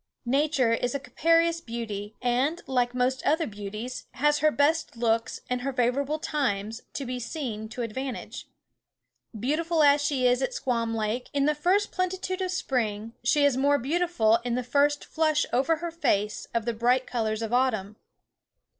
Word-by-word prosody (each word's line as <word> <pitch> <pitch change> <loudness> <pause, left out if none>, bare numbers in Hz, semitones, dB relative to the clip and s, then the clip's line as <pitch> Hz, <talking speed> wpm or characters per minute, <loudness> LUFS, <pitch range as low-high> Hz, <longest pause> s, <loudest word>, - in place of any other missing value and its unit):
Nature 270 -2 +2
is 245 +3 -1
a - - 0
capricious 330 +5 +2
beauty, 220 -4 -5
and, 260 +8 +1
like 250 -2 0
most 255 +1 0
other 320 +3 +2
beauties, 215 +3 -6
has 295 +2 +2
her 310 - +4
best 300 -2 +1
looks, 230 -1 0
and 250 0 -2
her 275 +2 -2
favourable 265 +4 0
times, 225 -8 -2
to 275 - -5
be 250 0 -4
seen 230 -5 -5
to 240 +1 -4
advantage. 255 +3 -5 0.9
Beautiful 315 +6 +1
as 285 0 +5
she 275 -3 +1
is 250 +1 +3
at 265 - -1
Squawm 230 -3 -1
Lake 220 +3 -2
in 280 -1 +3
the 300 - +3
first 370 +7 +1
plenitude 370 +1 -2
of 370 - -1
spring, 230 - -2
she 285 +4 +3
is 285 -3 +3
more 285 +2 +3
beautiful 280 -6 +2
in 240 -1 -1
the 250 - -1
first 285 +4 +2
flush 310 -2 +1
over 270 +6 +3
her 335 +1 -5
face 210 -10 0
of 230 -2 -1
the 235 - 0
bright 245 +3 +2
colours 220 -2 -2
of 225 +1 -4
autumn. 220 -6 +1
255 Hz, 170 wpm, -27 LUFS, 230-295 Hz, 0.9 s, as